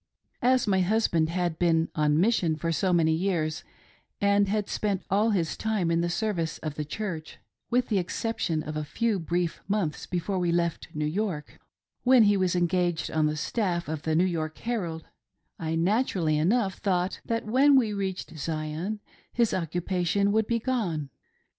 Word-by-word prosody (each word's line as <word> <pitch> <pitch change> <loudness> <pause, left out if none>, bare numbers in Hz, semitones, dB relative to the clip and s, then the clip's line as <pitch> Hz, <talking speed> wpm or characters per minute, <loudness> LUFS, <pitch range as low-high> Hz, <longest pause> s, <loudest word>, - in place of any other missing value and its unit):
As 255 0 +3
my 195 -3 +2
husband 180 -5 +2
had 175 -2 -1
been 165 -2 +2
on 150 0 +2
mission 180 -5 +2
for 165 +2 -2
so 185 +3 +1
many 165 -2 +3
years 160 -3 -1 0.6
and 200 0 +3
had 210 0 0
spent 200 -3 -1
all 210 +3 +3
his 175 -7 0
time 210 -6 0
in 165 0 +2
the 175 - 0
service 170 -4 -1
of 155 -2 -5
the 150 - -3
Church, 165 0 -5 0.3
with 250 0 +1
the 205 -4 +2
exception 175 -4 -2
of 155 0 -6
a 155 - -2
few 220 +6 0
brief 170 +1 -2
months 195 -7 -1
before 185 +2 -2
we 175 -1 +1
left 170 -1 0
New 150 0 -1
York 160 -2 -3 0.2
— - - -57
when 255 -2 +6
he 205 -1 +4
was 185 -2 +1
engaged 175 -1 0
on 155 -1 +2
the 150 0 -2
staff 175 -1 -1
of 155 -1 -3
the 160 0 0
New 175 +3 +4
York 160 -3 -2
Herald 175 -9 -3 0.3
— - - -49
I 160 -1 -2
naturally 175 -3 +1
enough 190 +5 +1
thought 185 -1 0
that 230 -1 -2
when 270 +6 +5
we 230 -5 +3
reached 190 -4 -4
Zion 160 +7 -3 0.3
his 235 -2 +1
occupation 180 +3 0
would 220 0 +2
be 235 - +1
gone. 195 - -2
180 Hz, 180 wpm, -27 LUFS, 160-210 Hz, 0.6 s, when